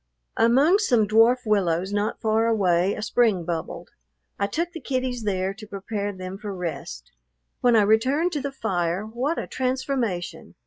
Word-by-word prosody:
Among 275 - +4
some 240 - +2
dwarf 230 +4 +4
willows 190 -3 +1
not 205 +1 -1
far 220 0 +1
away 190 -4 +2
a 215 - -5
spring 220 -7 +2
bubbled. 170 0 -5 0.5
I 200 - +1
took 335 +11 -2
the 335 - -7
kiddies 255 -4 -3
there 190 -1 -1
to 215 +1 -12
prepare 205 +1 -4
them 185 0 -7
for 205 -2 -6
rest. 160 - -6 0.5
When 245 -1 +3
I 215 - +5
returned 260 - +2
to 295 -4 -2
the 280 +1 -3
fire, 185 -6 -2
what 250 +9 -2
a - - -2
transformation! 255 -8 -3
215 Hz, 165 wpm, -24 LUFS, 190-255 Hz, 0.5 s, I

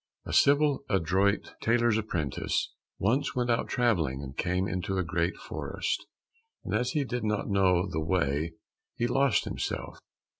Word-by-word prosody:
A - - -5
civil, 145 0 +4
adroit 95 +3 +1
tailor's 120 -1 +3
apprentice 90 -11 -1 0.3
once 130 +9 +1
went 125 -1 +1
out 115 - +1
travelling, 85 - +1
and 65 0 -8
came 90 +2 0
into 95 0 -2
a 95 - +1
great 85 +1 0
forest, - - -3 0.6
and, - - -4
as 125 - 0
he 150 - +1
did 125 -2 -3
not 105 -1 -1
know 95 -2 +3
the 80 -3 -2
way, 80 -2 0 0.4
he 120 - 0
lost 135 -1 +2
himself. - - -4
95 Hz, 150 wpm, -29 LUFS, 85-120 Hz, 0.6 s, civil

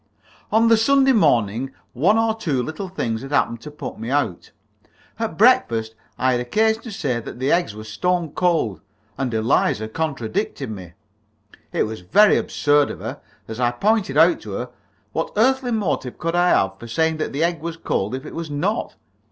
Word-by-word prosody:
On 225 +2 +4
the 230 0 +6
Sunday 270 +4 +4
morning 130 - +2 0.2
one 180 - +3
or 225 0 +2
two 160 - -1
little 160 +8 -5
things 115 -11 -3
had 135 - -8
happened 115 -5 0
to 150 - -8
put 150 -6 -8
me 115 +2 -5
out. 135 -10 -1 0.7
At - - -3
breakfast 110 -1 +3 0.2
I 130 0 +2
had 125 -1 +1
occasion 220 - +1
to 230 - -8
say 135 - -2
that 120 - -8
the 130 +3 0
eggs 170 -12 +1
were 110 - -8
stone 170 +9 -1
cold, 155 - 0 0.3
and 135 -2 -2
Eliza 110 -1 +1
contradicted 140 - -3
me. 90 -5 -9 0.8
It - - +1
was 110 -3 -5
very 200 - +5
absurd 145 -1 +2
of - - -7
her. - - -6 0.3
As 110 +1 -7
I 120 -1 +3
pointed 190 - 0
out 165 +2 +5
to 105 - -7
her, 125 +5 -4 0.4
what 160 - -2
earthly 260 +3 +3
motive 185 - -1
could 165 0 -2
I 175 0 +4
have 95 - +2
for 120 - -9
saying 160 +6 0
that 155 - -2
an 145 +4 -1
egg 170 -2 0
was 165 0 -5
cold 105 -7 -2
if 130 +3 -7
it - - -8
was 165 -1 -5
not? 175 +10 -2
145 Hz, 190 wpm, -22 LUFS, 115-180 Hz, 0.8 s, the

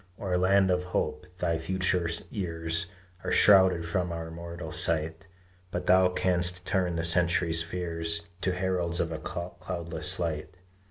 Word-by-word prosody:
O - - -6
land 95 +1 +4
of 90 0 +1
hope! 90 -2 -2
thy 85 -3 0
future 90 0 0 0.2
years 85 -4 -2 0.4
Are - - -2
shrouded 95 -4 +6
from 90 +1 -1
our 80 -1 -5
mortal 85 +1 -7
sight; 80 +2 -1 0.4
But - - -4
thou 95 0 +5
canst 90 -1 +1
turn 90 -2 0
the 80 - -1
century's 85 -1 +2
fears 85 -1 -3 0.2
To 95 - +1
heralds 90 -2 -1
of 85 - 0
a 80 - -4
cloudless 85 -1 -3
light! 80 0 -3
85 Hz, 145 wpm, -28 LUFS, 80-90 Hz, 0.4 s, shrouded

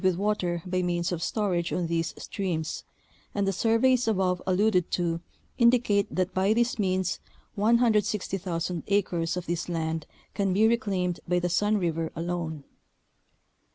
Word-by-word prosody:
with 185 -1 +3
water 185 -4 -1
by 185 0 0
means 175 0 -1
of 170 -2 -3
storage 180 -4 0
on 180 - 0
these 165 0 -1
streams, 170 -5 -3 0.5
and 200 -1 +1
the 195 - +1
surveys 230 +4 +3
above 185 -4 +1
alluded 185 -1 +2
to 170 -2 -1 0.4
indicate 235 -4 +4
that 185 0 -1
by 190 +3 +3
this 235 0 +1
means 185 -2 0 0.3
160,000 205 -6 +1
acres 180 -4 0
of 180 - -4
this 170 0 -3
land 160 -2 -2 0.3
can 195 -2 0
be 215 +4 +4
reclaimed 195 -6 0
by 180 +1 +2
the 175 0 0
Sun 210 +4 +2
River 165 -3 -1
alone. 165 -3 -3
185 Hz, 145 wpm, -27 LUFS, 170-210 Hz, 0.5 s, indicate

